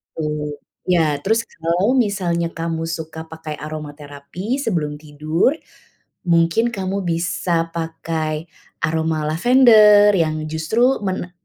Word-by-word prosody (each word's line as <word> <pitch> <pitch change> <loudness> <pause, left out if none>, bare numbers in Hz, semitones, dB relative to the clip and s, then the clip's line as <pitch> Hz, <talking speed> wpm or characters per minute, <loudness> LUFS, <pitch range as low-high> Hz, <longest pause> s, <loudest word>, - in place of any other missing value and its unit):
Tuh. 150 -1 -3 0.3
Ya, 180 -2 +3 0.2
terus 220 +7 +1
kalau 170 +7 0
misalnya 185 -7 0
kamu 165 0 -2
suka 160 0 -6
pakai 160 -2 -7
aroma 150 -1 -6
terapi 145 - -5
sebelum 155 - -1
tidur, 155 - 0 0.8
mungkin 170 +7 +3
kamu 195 0 -2
bisa 170 0 -1
pakai 160 -1 -3 0.4
aroma 160 -1 -1
lavender 210 +1 +6
yang 155 -3 0
justru 160 +8 -2 0.3
men 185 -1 -3
165 Hz, 110 wpm, -20 LUFS, 155-185 Hz, 0.8 s, lavender